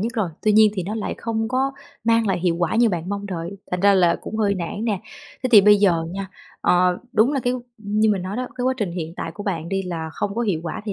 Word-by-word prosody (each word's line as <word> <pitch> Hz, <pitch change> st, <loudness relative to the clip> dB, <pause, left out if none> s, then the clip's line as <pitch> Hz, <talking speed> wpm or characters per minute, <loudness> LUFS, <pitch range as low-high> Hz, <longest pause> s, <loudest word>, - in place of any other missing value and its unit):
nhất 230 Hz, +4 st, -2 dB
rồi, 215 Hz, -6 st, 0 dB
tuy 215 Hz, -, +3 dB
nhiên 215 Hz, 0 st, +6 dB
thì 185 Hz, -, -2 dB
nó 200 Hz, +5 st, -4 dB
lại 220 Hz, -, -3 dB
không 225 Hz, -1 st, -2 dB
có 265 Hz, +2 st, 0 dB, 0.3 s
mang 230 Hz, -1 st, +3 dB
lại 190 Hz, -3 st, +1 dB
hiệu 170 Hz, -1 st, +1 dB
quả 175 Hz, +2 st, 0 dB
như 235 Hz, 0 st, +5 dB
bạn 175 Hz, -3 st, -3 dB
mong 200 Hz, 0 st, -3 dB
đợi, 180 Hz, 0 st, -5 dB
thành 180 Hz, -, -1 dB
ra 200 Hz, +1 st, +5 dB
là 175 Hz, -3 st, +4 dB
cũng 220 Hz, -, -5 dB
hơi 205 Hz, -2 st, +2 dB
nản 185 Hz, +4 st, -4 dB
nè. 210 Hz, -5 st, -1 dB, 0.4 s
Thế 255 Hz, -, 0 dB
thì 210 Hz, -, +10 dB
bây 210 Hz, +1 st, +6 dB
giờ 180 Hz, -5 st, +2 dB
nha, 195 Hz, +1 st, -4 dB, 0.3 s
ờ, 180 Hz, 0 st, +3 dB
đúng 235 Hz, +5 st, +3 dB
là 275 Hz, -, 0 dB
cái 245 Hz, 0 st, 0 dB, 0.3 s
như 215 Hz, +1 st, +1 dB
mình 195 Hz, -3 st, 0 dB
nói 190 Hz, +4 st, -4 dB
đó, 255 Hz, -, -2 dB
cái 250 Hz, -, -2 dB
quá 260 Hz, 0 st, +2 dB
trình 205 Hz, -8 st, -2 dB
hiện 165 Hz, -2 st, -5 dB
tại -, -, -4 dB
của 205 Hz, -, -7 dB
bạn 170 Hz, -5 st, -3 dB
đi 195 Hz, +1 st, -1 dB
là 165 Hz, -3 st, -4 dB
không 200 Hz, -1 st, -3 dB
có 235 Hz, -, -1 dB
hiệu 190 Hz, -8 st, 0 dB
quả 160 Hz, -, -4 dB
thì 210 Hz, -, -3 dB
200 Hz, 280 wpm, -22 LUFS, 180-220 Hz, 0.4 s, thì